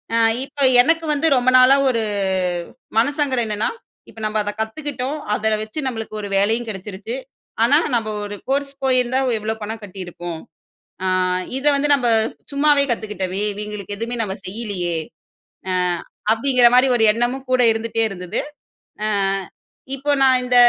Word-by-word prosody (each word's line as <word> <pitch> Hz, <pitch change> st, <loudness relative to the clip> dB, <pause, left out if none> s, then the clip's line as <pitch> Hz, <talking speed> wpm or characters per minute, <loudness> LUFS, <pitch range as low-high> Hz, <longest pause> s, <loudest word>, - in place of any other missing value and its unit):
அ -, -, +3 dB, 0.3 s
இப்போ 280 Hz, 0 st, -3 dB, 0.2 s
எனக்கு 325 Hz, +5 st, +1 dB
வந்து 295 Hz, +3 st, +1 dB
ரொம்ப 250 Hz, +1 st, +3 dB
நாளா 255 Hz, +2 st, +7 dB
ஒரு 230 Hz, -3 st, 0 dB, 1.0 s
மனசங்கடம் 275 Hz, -2 st, +1 dB
என்னென்னா, 210 Hz, 0 st, -1 dB, 0.4 s
"இப்போ -, -, -13 dB
நம்ம 215 Hz, 0 st, -1 dB
அதை 205 Hz, -, -2 dB
கத்துக்கிட்டோம், 265 Hz, +4 st, -3 dB, 0.2 s
அத 220 Hz, 0 st, +1 dB
வச்சு 215 Hz, +8 st, -6 dB
நம்மளுக்கு 225 Hz, -3 st, -5 dB
ஒரு 205 Hz, -, -5 dB
வேலையும் 225 Hz, +4 st, +1 dB
கெடச்சுருச்சு. 200 Hz, +3 st, -6 dB, 0.5 s
ஆனா 270 Hz, +5 st, +5 dB, 0.2 s
நம்ம 225 Hz, -2 st, 0 dB, 0.2 s
ஒரு 205 Hz, 0 st, -6 dB
கோர்ஸ் 275 Hz, 0 st, 0 dB
போயிருந்தா 255 Hz, -1 st, +2 dB, 0.2 s
எவ்ளோ 215 Hz, +1 st, -2 dB
பணம் 220 Hz, +1 st, -5 dB
கட்டிருப்போம். 175 Hz, -4 st, -7 dB, 0.6 s
ஆ -, -, 0 dB, 0.5 s
இத 270 Hz, -, -5 dB
வந்து 285 Hz, +1 st, 0 dB
நம்ம 260 Hz, -3 st, 0 dB, 0.5 s
சும்மாவே 285 Hz, 0 st, +4 dB
கத்துக்கிட்டோமே! 205 Hz, -4 st, -2 dB
இவுங்களுக்கு 210 Hz, -1 st, -6 dB
எதுவுமே 235 Hz, +2 st, -3 dB
நம்ம 190 Hz, -3 st, -3 dB
செய்யலயே!" 185 Hz, -5 st, -3 dB, 0.8 s
அ -, -, +1 dB, 0.6 s
அப்டீங்குற 245 Hz, +2 st, +4 dB
மாரி 255 Hz, +2 st, +6 dB
ஒரு 230 Hz, -, +2 dB
எண்ணமும் 240 Hz, +4 st, -1 dB
கூட 255 Hz, -1 st, +4 dB
இருந்துட்டே 225 Hz, 0 st, -2 dB
இருந்தது. 180 Hz, -2 st, -4 dB, 0.7 s
அ -, -, +1 dB, 0.9 s
இப்போ 285 Hz, +2 st, -1 dB
நான் 260 Hz, -1 st, +5 dB
இந்த 250 Hz, 0 st, 0 dB
230 Hz, 140 wpm, -20 LUFS, 210-265 Hz, 1.0 s, நாளா